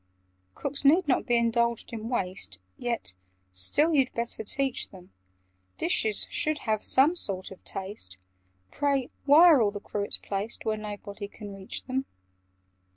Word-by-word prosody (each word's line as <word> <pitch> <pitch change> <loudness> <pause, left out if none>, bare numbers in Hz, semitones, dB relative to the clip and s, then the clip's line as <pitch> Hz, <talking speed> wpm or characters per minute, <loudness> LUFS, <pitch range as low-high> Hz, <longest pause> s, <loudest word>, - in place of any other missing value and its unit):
"Cooks 280 0 -3
need 310 +5 +5
not 260 - +1
be 240 -1 +3
indulged 235 0 +1
in 225 0 -5
waste; 180 - -3 0.2
Yet 235 - -3 0.4
still 290 - +1
you'd 270 -4 +3
better 235 -1 -3
teach 270 +3 0
them 185 -2 -15 0.7
Dishes 210 +4 +3
should 310 0 0
have 215 -2 0
some 290 +7 +4
sort 190 - 0
of 190 - -12
taste. 190 - -6 0.5
Pray, 280 -3 0
why 295 +4 +8
are 315 -7 +7
all 210 - +3
the 205 0 -6
cruets 205 0 -2
placed 205 +4 -5
Where 220 -1 +1
nobody 205 -1 -7
can 205 -1 -10
reach 195 -1 -5
them? 265 +1 -2
225 Hz, 150 wpm, -28 LUFS, 200-270 Hz, 0.7 s, why